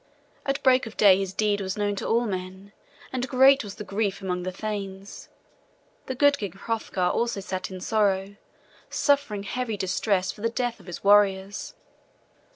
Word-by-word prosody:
At 275 +1 -1
break 255 -2 +4
of 220 - -11
day 195 -2 +6
his 195 -1 -2
deed 205 0 0
was 190 +1 -3
known 205 -1 0
to - - -3
all 235 +2 +2
men, 190 0 -5 0.4
and 255 0 -2
great 270 +1 +6
was 200 -2 -8
the - - -7
grief 200 -1 -2
among 180 -2 -3
the 185 +1 -3
thanes. 195 -1 -6 0.8
The 260 - -3
good 285 +2 +4
King 200 -5 -4
Hrothgar 195 -3 -2
also 235 +1 -1
sat 185 -1 -4
in 185 -1 -7
sorrow, 200 -1 0 0.5
suffering 280 -9 +1
heavy 225 +1 -3
distress 190 0 0
for 210 - -14
the 230 - +1
death 240 0 -2
of 190 - -17
his 175 - -7
warriors. 200 - +3
205 Hz, 170 wpm, -26 LUFS, 190-230 Hz, 0.8 s, day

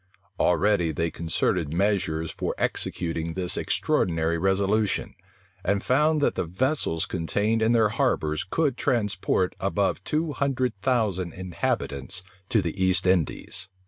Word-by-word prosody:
Already 90 -3 +3
they 85 +2 -1
concerted 80 -1 -1
measures 85 -3 0
for - - -3
executing 85 -1 -2
this 90 -1 +1
extraordinary 85 -1 +1
resolution; 100 +3 +1 0.5
and 100 +1 0
found 150 +4 +3
that - - +2
the - - -2
vessels 95 - 0
contained 105 +6 0
in 110 +1 +3
their 110 -3 +4
harbors 80 -6 0
could 140 +4 0
transport 105 -6 0
above 95 0 0
two 155 - -1
hundred 130 -3 0
thousand 100 -9 0
inhabitants 90 -2 -2 0.3
to 110 -4 +2
the 95 +3 -2
East 95 0 +3
Indies. 90 +1 0
95 Hz, 125 wpm, -26 LUFS, 85-110 Hz, 0.5 s, their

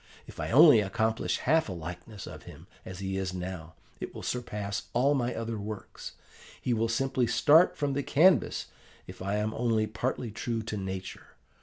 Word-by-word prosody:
'If - - -13
I - - -3
only 145 -2 +8
accomplish 110 +2 0
half 160 -1 +2
a - - -3
likeness 90 +5 -8
of - - -9
him, - - -13 0.2
as 95 - -8
he 95 0 -2
is 95 -1 -3
now, 90 -3 -6 0.2
it - - -7
will - - -7
surpass 105 -5 -3
all 135 +4 +3
my 125 -3 -1
other 115 -1 -4
works: 105 0 -7 0.5
he 125 - -1
will 115 0 0
simply 130 +1 +1
start 145 +9 +5
from 145 -2 0
the 140 - 0
canvas 155 - +3 0.4
if - - -11
I 100 +2 -1
am 105 +1 -1
only 115 -2 +1
partly 120 +1 -3
true 115 +1 -3
to 110 - -4
nature. 95 -1 -6
110 Hz, 180 wpm, -29 LUFS, 100-125 Hz, 0.5 s, only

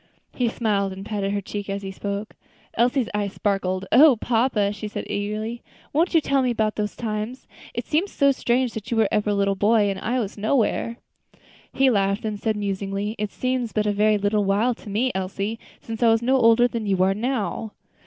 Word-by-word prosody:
He 245 -2 0
smiled, 200 -4 0
and 190 +1 -8
patted 205 -2 -2
her 200 0 -1
cheek 205 +1 -6
as 200 0 -3
he 195 - -5
spoke. 200 +2 -5 0.4
Elsie's 245 +1 +2
eyes 205 -1 -1
sparkled. 195 -2 -1
"O 285 0 +7
papa!" 225 -3 +1
she 210 +1 -6
said 210 - -5
eagerly; 215 +3 -3 0.3
"won't 335 +4 +2
you - - +8
tell 275 -2 +1
me 255 - +1
about 220 -2 0
those 210 -1 -3
times? 220 +2 -4 0.3
It - - -3
seems 340 +6 0
so 280 -1 +3
strange 250 -2 0
that 215 -2 -7
you 235 - -1
were 220 -2 +4
ever 210 0 +1
a 205 - +1
little 200 0 +2
boy 205 +1 +3
and 190 - -5
I 245 +6 -1
was 210 -2 -4
nowhere." 230 +1 0 0.7
He 265 0 +3
laughed. 200 +1 +1
Then 215 -1 -2
said, 220 +1 0
musingly, 200 +1 -3
"It 210 -1 -2
seems 255 -3 -2
but 210 -1 +1
a 210 - +2
very 210 +1 +3
little 205 +1 +1
while 205 +5 +2
to 220 - -12
me, 235 +6 +1
Elsie, 195 +4 -3 0.2
since 225 0 -7
I 235 - +5
was 225 +1 +3
no 260 +2 +3
older 240 -1 +5
than 230 -3 -4
you 190 -2 +2
are 190 +1 +3
now." 225 -1 -2
215 Hz, 210 wpm, -23 LUFS, 200-240 Hz, 0.7 s, you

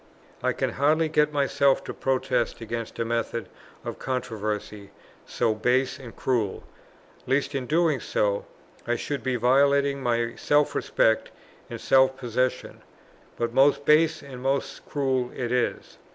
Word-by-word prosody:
I - - +1
can - - -2
hardly 155 +3 +2
get 150 -1 +2
myself 140 -1 +2
to - - -6
protest 125 -3 -1
against 115 0 -5
a 115 - -1
method 115 0 -2 0.4
of - - -5
controversy 105 -5 -4 0.4
so 110 - 0
base 125 +4 +1
and 125 -4 -11
cruel, 115 -7 -1 0.6
lest 135 +2 +1
in 130 -2 -3
doing 160 -2 +2
so, - - -1 0.4
I - - +1
should 145 -1 -3
be 130 -1 -1
violating 140 +3 +3
my 120 -2 0
self 145 0 +2
respect 110 0 +1 0.4
and - - -6
self 130 0 +4
possession; 125 +1 -2 0.6
but 120 0 -2
most 140 +2 +4
base 155 +1 +4
and 130 -3 -9
most 135 +1 -2
cruel 130 -3 0
it 120 -2 -3
is. 125 -1 -2
130 Hz, 140 wpm, -26 LUFS, 120-140 Hz, 0.6 s, self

